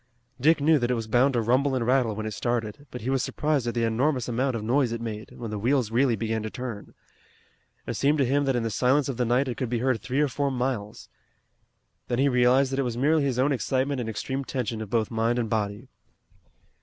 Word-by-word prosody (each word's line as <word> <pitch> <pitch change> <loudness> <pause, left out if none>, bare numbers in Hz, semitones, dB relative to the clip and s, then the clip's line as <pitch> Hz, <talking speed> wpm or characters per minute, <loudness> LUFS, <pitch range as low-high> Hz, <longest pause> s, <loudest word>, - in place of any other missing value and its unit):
Dick 155 +5 +4
knew 155 +1 +4
that 120 -1 -1
it 125 - +2
was 115 -1 -3
bound 125 +4 +2
to 120 - +2
rumble 130 +4 +2
and 120 -3 -1
rattle 125 -3 +2
when 110 +1 -4
it 110 - -4
started, 120 +4 -3
but 125 - -8
he 125 +4 -2
was 135 -1 +1
surprised 150 -5 -1
at 120 - -2
the 120 - +1
enormous 125 +3 +1
amount 125 +2 0
of 110 - -4
noise 125 +2 +2
it 115 - -3
made, 110 -2 -6
when 115 -3 -6
the 105 - -3
wheels 125 0 +1
really 120 0 +3
began 110 +1 -2
to 110 - -4
turn. 120 -4 -7 0.9
It - - -3
seemed 145 +2 +2
to 140 - +2
him 140 +3 +1
that 135 -1 +1
in 120 - 0
the 115 - -2
silence 130 +5 +2
of 130 - -3
the 125 - +1
night 125 +4 +2
it 125 - -4
could 130 - -2
be 120 - 0
heard 125 -1 0
three 125 +2 -2
or 150 - +3
four 140 +2 -1
miles. 125 -5 -3 1.0
Then 120 - -1
he 140 +2 +3
realized 125 +2 +3
that 135 - -1
it - - +3
was 120 -3 -2
merely 150 +5 +3
his 135 -3 -1
own 135 +3 +2
excitement 135 +2 0
and 115 - -4
extreme 130 +5 -3
tension 120 -4 -3
of 110 - -6
both 115 -1 0
mind 115 +1 +1
and 115 -3 -2
body. 105 +2 -2
125 Hz, 245 wpm, -26 LUFS, 115-135 Hz, 1.0 s, Dick